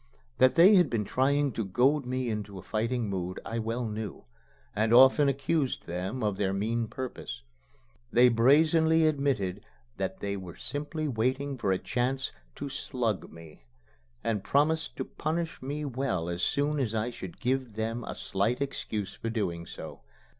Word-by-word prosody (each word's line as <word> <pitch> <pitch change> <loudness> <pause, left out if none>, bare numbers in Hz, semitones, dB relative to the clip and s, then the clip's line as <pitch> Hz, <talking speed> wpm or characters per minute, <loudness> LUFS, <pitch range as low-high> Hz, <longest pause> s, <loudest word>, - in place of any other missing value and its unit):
That 130 - +5
they 180 +5 +8
had 175 -6 +4
been 110 -3 -1
trying 140 +5 +2
to 115 0 -2
goad 125 +8 +2
me 130 0 -1
into 105 -3 -4
a 95 - -9
fighting 115 +3 -1
mood 90 -2 -3
I 115 +1 -3
well 115 +2 -2
knew, 105 -3 -5 0.5
and 110 +2 +1
often 135 +4 +7
accused 140 +1 0
them 95 +8 -3
of 105 -2 0
their 95 -2 0
mean 115 +4 -1
purpose. 120 - -6 0.7
They 125 +1 +6
brazenly 160 +7 +4
admitted 135 -11 0 0.3
that - - -3
they 100 0 -2
were 90 -3 -8
simply 150 +3 -3
waiting 130 +3 0
for 100 -6 0
a 95 - +2
chance 130 +5 -1 0.2
to 145 - -5
"slug" 125 -6 -2
me, 80 -7 -14 0.6
and 105 -4 -1
promised 155 +3 +1
to - - -3
punish 165 +1 -3
me 145 +3 -3
well 125 -11 -2
as 85 0 -3
soon 145 +9 +1
as 115 -5 -1
I 110 +3 -1
should 95 -6 -9
give 130 -2 -1
them 115 +2 -2
a - - -5
slight 105 +6 -1
excuse 110 -7 -3
for 115 - -5
doing 85 -7 -2
so. - - -9
120 Hz, 165 wpm, -29 LUFS, 105-140 Hz, 0.7 s, they